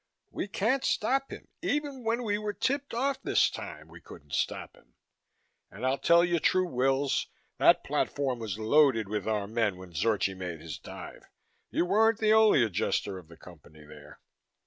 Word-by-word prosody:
We - - -4
can't 225 +7 0
stop 270 +5 0
him. - - -9
Even 285 -3 -2
when 230 +2 0
we 205 -2 -1
were 210 -1 -3
tipped 280 +7 -1
off 270 +3 -1
this - - +2
time 75 +1 -8
we 85 +1 -14
couldn't 75 -3 -14
stop - - -2
him. - - -25 0.7
And 110 +6 -7
I'll 130 +1 +1
tell 170 +1 +5
you 175 -1 +1
true, 185 +3 +2
Wills, 135 -1 0 0.3
that - - +5
platform 135 -4 -1
was 110 -3 -4
loaded 115 -1 +3
with 105 -1 -3
our 105 -2 0
men 105 -3 -1
when 90 -1 -12
Zorchi 100 +3 +1
made 90 -3 -6
his 80 -3 -8
dive. - - -10 0.4
You - - 0
weren't 220 +4 +3
the 215 -1 +3
only 220 - +5
Adjuster 100 -1 -1
of 85 - -16
the 85 0 -15
Company 75 -3 -15
there." 75 0 -14
130 Hz, 175 wpm, -29 LUFS, -, 0.7 s, tell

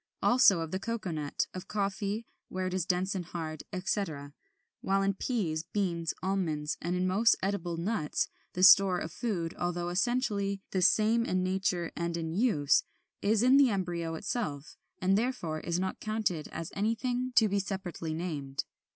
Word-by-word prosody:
Also 240 -8 +6
of 160 -1 -4
the 190 - -1
cocoa 215 -3 -3
nut, 150 -3 -2
of 185 +1 -7
coffee 205 +2 -2 0.2
(where 185 0 -3
it 185 - -2
is 185 -3 -1
dense 185 +1 +1
and 190 -2 -3
hard), 160 -3 -5
etc.; 180 -7 -3 0.5
while 195 0 +1
in 195 0 +2
peas, 190 -7 -1
beans, 170 -5 0
almonds, 165 -6 -1
and 175 +2 -1
in 180 0 0
most 210 +5 +4
edible 180 -4 -1
nuts, 170 -3 -1 0.3
the 180 - -1
store 195 -1 +8
of 160 - -4
food, 175 -6 -2
although 175 0 -1
essentially 200 -1 0
the 190 - 0
same 220 +5 +4
in 185 -4 0
nature 185 -2 0
and 170 0 -2
in 160 -1 -3
use, 175 - +3 0.4
is 215 +2 +2
in 255 +2 +6
the 280 -2 +6
embryo 175 -5 -2
itself, 155 - -4 0.2
and 190 +2 +3
therefore 220 -11 -2
is 170 +2 -2
not 190 0 -2
counted 215 -7 -1
as 165 +1 -5
anything 245 +4 -1
to 220 - +6
be 200 0 +1
separately 185 -5 -4
named. 145 -5 -3
185 Hz, 170 wpm, -30 LUFS, 170-205 Hz, 0.5 s, store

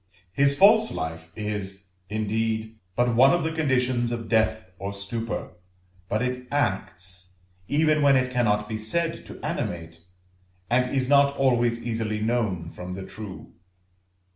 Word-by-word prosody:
His 140 +3 +3
false 220 +4 +6
life 80 0 -5
is, 100 -2 -4 0.2
indeed, 110 +1 -2 0.2
but 120 0 +2
one 130 +7 +6
of 175 - -1
the 160 - 0
conditions 130 -6 +1
of 115 -2 -4
death 110 -3 +1
or 100 +2 -4
stupor, 115 +3 -4 0.6
but 110 +4 0
it 125 0 -3
acts, 95 -8 -2 0.3
even 155 +1 +3
when 140 -1 +6
it 130 0 +2
cannot 105 -4 +2
be 110 0 -4
said 165 +10 -2
to - - -10
animate, 85 -1 -4 0.7
and 125 +1 +3
is 130 -1 0
not 140 0 +4
always 120 -3 +2
easily 110 -2 -2
known 105 -7 0
from 90 +2 -7
the 95 0 -6
true. 105 -2 -9
115 Hz, 140 wpm, -25 LUFS, 105-130 Hz, 0.7 s, false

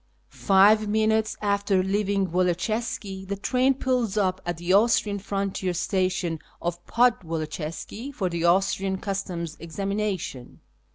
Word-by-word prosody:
Five 205 +2 +4
minutes 220 +1 +1
after 200 -2 +2
leaving 195 -1 0
Woloczyska 190 +2 -1
llie 200 0 -4
train 260 +1 +3
])ull.s 245 -5 +1
up 190 -2 +1
at 175 -1 -2
the 175 +2 0
Austrian 205 -1 +3
liontier 195 -2 -2
station 185 -2 0 0.2
of 175 0 -4
rodwoloczyska 165 - -1
for 200 -9 -2
tlie 170 -1 -3
Austrian 190 +2 +2
Customs' 185 -5 -4
examination. 195 -6 -4
195 Hz, 115 wpm, -25 LUFS, 180-210 Hz, 0.2 s, Five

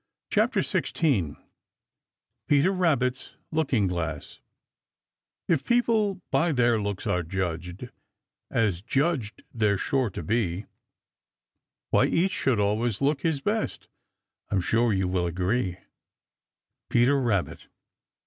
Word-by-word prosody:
CHAPTER - - +2
XVI 100 - 0 1.1
PETER 145 +6 +4
RABBIT'S 140 -9 0 0.2
LOOKING 140 -10 +1
GLASS 80 -4 -4 1.1
If 160 -5 +2
people 220 -5 +1
by 150 +5 +2
their 120 -5 +2
looks 100 -2 -3
are 90 - +1
judged, 90 +5 -4 0.6
As 105 -7 +1
judged 135 - -1
they're 105 -3 +2
sure 130 0 0
to 90 - -6
be, 100 -1 -1 1.3
Why - - +5
each 185 +4 +1
should 130 - +1
always 105 +2 0
look 140 0 +1
his 160 -3 0
best, 215 +7 -2 0.6
I'm 95 - +1
sure 115 +6 +2
you 95 -2 +1
will 90 -1 0
agree. 90 +2 -1 1.1
Peter 130 +4 +3
Rabbit. 105 -8 -1
120 Hz, 110 wpm, -26 LUFS, 95-145 Hz, 1.3 s, Why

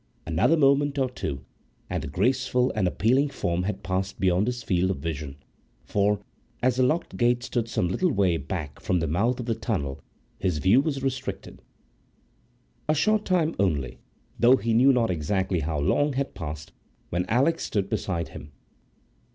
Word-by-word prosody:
Another 100 - +2
moment 140 0 +3
or 130 -2 +1
two, 70 - -5 0.4
and - - -2
the - - -5
graceful 125 - +1
and 105 -4 +1
appealing 130 +10 +2
form 90 -9 -1
had 100 +3 -3
passed 95 +1 -2
beyond 95 +2 +2
his 125 0 -3
field 90 0 +1
of 95 - -1
vision, 75 -2 -5 0.5
for, 105 0 +1 0.4
as 125 -1 +2
the 130 - +4
locked 155 +7 0
gate 120 0 +2
stood 120 -1 -2
some 90 - 0
little 180 - +1
way 95 -8 +2
back 75 -1 -5
from 90 - 0
the 80 - 0
mouth 105 - 0
of 125 - -4
the 115 - 0
tunnel, 100 -11 -3 0.4
his 90 -4 0
view 95 - +4
was 140 -3 -2
restricted.A 130 0 -7
short 215 +7 +2
time 170 -3 +1
only, 70 -9 0 0.4
though 120 +2 +7
he 115 -3 -1
knew 130 +4 +6
not 120 -5 +2
exactly 90 +3 0
how 75 0 -2
long, 145 - +1
had 140 +1 -2
passed 75 -2 -7 0.4
when 90 +2 -1
Alix 140 +8 +2
stood 100 -2 -1
beside 85 -5 -2
him. 75 -1 -11
105 Hz, 165 wpm, -26 LUFS, 85-130 Hz, 0.5 s, though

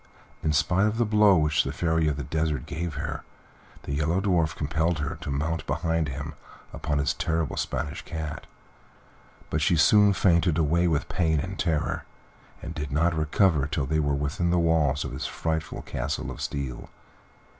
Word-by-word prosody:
In 80 - +1
spite 90 +7 +2
of 105 +1 -1
the 120 - +2
blow 105 -3 +5
which 75 -1 +2
the - - -3
Fairy 80 -2 +1
of 75 -2 0
the 70 - -3
Desert 80 -1 -1
gave 85 -1 -4
her, - - -4 0.6
the 70 - -4
Yellow 80 +5 +1
Dwarf 85 -5 +1
compelled 80 +3 0
her 75 -1 -3
to - - -5
mount 80 +4 -2
behind 80 -2 0
him 70 +2 -5 0.4
upon 75 -1 -2
his 70 - +1
terrible 80 -2 -1
Spanish 70 +3 -3
cat; 80 -3 -6 1.0
but 80 - 0
she 85 +3 +3
soon 100 +6 +6
fainted 85 -3 +3
away 85 +2 +2
with 75 -4 0
pain 80 -4 +1
and 95 +6 -5
terror, 80 -4 0 0.6
and 80 +2 -5
did 75 -4 -5
not 85 +4 +2
recover 80 -1 +2
till 75 -1 -1
they 80 +3 0
were 70 -2 +1
within 75 +5 -1
the 90 - +2
walls 80 -5 +2
of 70 - -5
his 65 - -4
frightful 80 -1 -3
Castle 70 +4 -3
of - - -8
Steel. 70 -3 -4
80 Hz, 175 wpm, -26 LUFS, 75-85 Hz, 1.0 s, soon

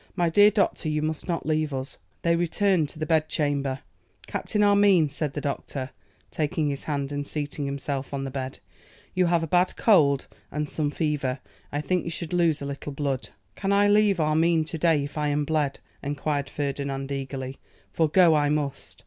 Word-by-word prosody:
'My 175 -3 +1
dear 205 +4 +7
doctor, 200 -6 0
you 150 0 0
must 155 +2 -3
not 170 -2 -2
leave 155 0 0
us.' 130 +1 -5 0.2
They 170 0 +3
returned 175 -1 +1
to - - -10
the 155 - -2
bedchamber. 145 -4 0 0.4
'Captain 210 -1 -1
Armine,' 200 -6 +5
said 150 0 -3
the - - -3
physician, 140 -1 -3 0.4
taking 155 0 0
his 140 -1 -4
hand 140 -2 -2
and 145 0 -3
seating 145 -1 -3
himself 140 0 -3
on 140 -1 -3
the 135 - -4
bed, 130 -1 -4 0.6
'you 185 -1 +2
have 170 -1 +2
a - - -2
bad 180 +3 +2
cold 145 - +4 0.3
and 150 0 -2
some 150 0 -1
fever; 145 -4 -1 0.3
I 145 - -1
think 180 +4 0
you - - -4
should 165 +1 -5
lose 165 -4 +2
a - - -3
little 140 +1 -5
blood.' 140 -2 -2 0.3
'Can 195 0 -1
I 200 +1 +4
leave 205 -2 +4
Armine 160 +1 +3
to 165 - -5
day, 160 -3 +3
if 145 +2 -5
I 150 - +1
am 145 0 0
bled?' 150 -3 0 0.2
enquired 145 0 -2
Ferdinand, 140 -1 -3
eagerly, 135 -1 -4 0.3
'for 160 -2 +2
go 175 0 +6
I 145 -1 +3
must! 145 -2 -3
150 Hz, 190 wpm, -26 LUFS, 140-170 Hz, 0.6 s, dear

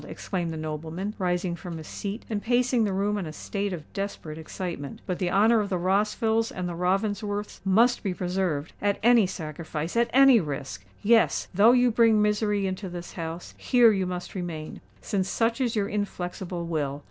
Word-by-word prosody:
exclaimed 175 -3 -3
the 160 - -5
nobleman, 160 +6 -4
rising 180 -1 0
from 170 -1 -7
his 160 - -8
seat 205 +7 -5
and 210 -2 -2
pacing 245 0 +2
the 205 - -1
room 205 +2 0
in 180 - -4
a - - -6
state 200 +5 -3
of 170 -4 -5
desperate 195 -6 -5
excitement. 160 -3 -6
"But 180 - -3
the 180 - 0
honour 220 +5 +4
of 205 -1 -1
the 185 - 0
Rossvilles 210 +5 +1
and 180 -1 -4
the 175 - -4
Ravensworths 205 +3 -1
must 225 +6 +3
be 195 - -1
preserved—at 180 +1 -1
any 235 -4 +6
sacrifice—at 165 +6 -2
any 270 -2 +7
risk!—Yes—though 150 - +2
you 250 -1 +4
bring 225 -1 +4
misery 210 -1 +1
into 190 0 -3
this 175 0 -8
house, 165 0 -6
here 240 -3 +5 0.2
must 180 -1 -5
you 185 - -3
remain—since 175 +4 -5
such 230 +3 0
is 240 -2 0
your 205 -2 +1
inflexible 180 -3 -4
will. 145 -4 -2
190 Hz, 170 wpm, -26 LUFS, 170-215 Hz, 0.2 s, any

